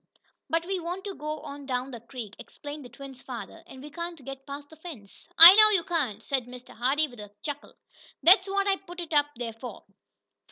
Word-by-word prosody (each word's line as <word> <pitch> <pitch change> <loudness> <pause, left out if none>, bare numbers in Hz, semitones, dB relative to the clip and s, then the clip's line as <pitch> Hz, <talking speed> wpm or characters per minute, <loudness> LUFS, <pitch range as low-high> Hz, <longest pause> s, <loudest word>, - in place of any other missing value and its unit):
"But 330 +1 0
we 380 0 -2
want 355 +3 -5
to 400 - -6
go 305 -2 -6
on 280 -1 -9
down 255 0 -3
the 240 - -8
creek," 230 -3 -9
explained 290 0 -10
the 245 - -12
twins' 265 +1 -12
father, 255 +6 -9
"and 265 -5 -12
we 300 - -10
can't 340 -3 -7
get 270 0 -9
past 285 +1 -9
the - - -13
fence." 295 - -12
"I 335 +3 +13
know 430 +1 +8
you 390 -5 +2
can't!" 265 - -2
said 260 -3 -2
Mr. 250 0 -12
Hardee 275 +7 +1
with 245 -5 -15
a 210 -1 -10
chuckle. 290 -1 -7 0.5
"That's 375 +2 +6
what 395 0 0
I 390 -1 +2
put 355 -2 -12
it 335 -2 -6
up 290 -1 +4
there 235 -2 -5
for. 225 0 -10
290 Hz, 215 wpm, -27 LUFS, 250-340 Hz, 0.5 s, I